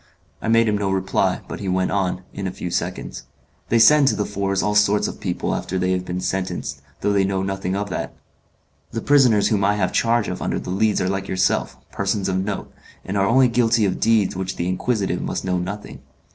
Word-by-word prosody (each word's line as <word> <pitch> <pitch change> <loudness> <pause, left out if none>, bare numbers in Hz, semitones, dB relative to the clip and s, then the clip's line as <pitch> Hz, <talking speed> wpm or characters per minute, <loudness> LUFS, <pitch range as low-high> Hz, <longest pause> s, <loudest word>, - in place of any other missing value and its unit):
I - - -4
made 115 0 +4
him 105 -1 +1
no 100 -1 0
reply, 95 0 0
but - - -6
he 100 - -3
went 95 0 0
on, 95 -1 -1
in 100 -1 -4
a - - -3
few 90 -1 -6
seconds, - - -4 0.4
"They 115 - +3
send 145 +5 +6
to - - +3
the 105 - -1
Fours 100 -1 -1
all 105 - +1
sorts 105 0 +3
of - - -7
people - - -2
after 95 - -3
they 90 0 0
have 90 0 -1
been 90 0 -3
sentenced, 90 -8 -3 0.2
though 105 - +1
they 100 -1 +3
know 95 0 -1
nothing 95 -1 -2
of 100 -1 -3
that. - - -4 0.7
The 115 - -4
prisoners 125 -8 +4
whom 105 -4 +1
I 100 +1 +3
have 95 -3 0
charge 115 -2 +2
of 90 - -4
under - - -1
the - - -5
Leads 105 +2 +1
are 95 - 0
like 95 0 -2
yourself, 95 0 0
persons 100 0 -1
of 95 0 0
note, 100 0 -5 0.3
and 95 - -4
are 100 0 +2
only 130 +2 +5
guilty 115 -2 +2
of 95 - -1
deeds 110 -4 +3
of 95 - -6
which 95 0 -3
the 85 - -2
inquisitive 100 +2 -1
must - - -3
know 90 -1 0
nothing. 100 +4 -6
100 Hz, 230 wpm, -22 LUFS, 95-105 Hz, 0.7 s, send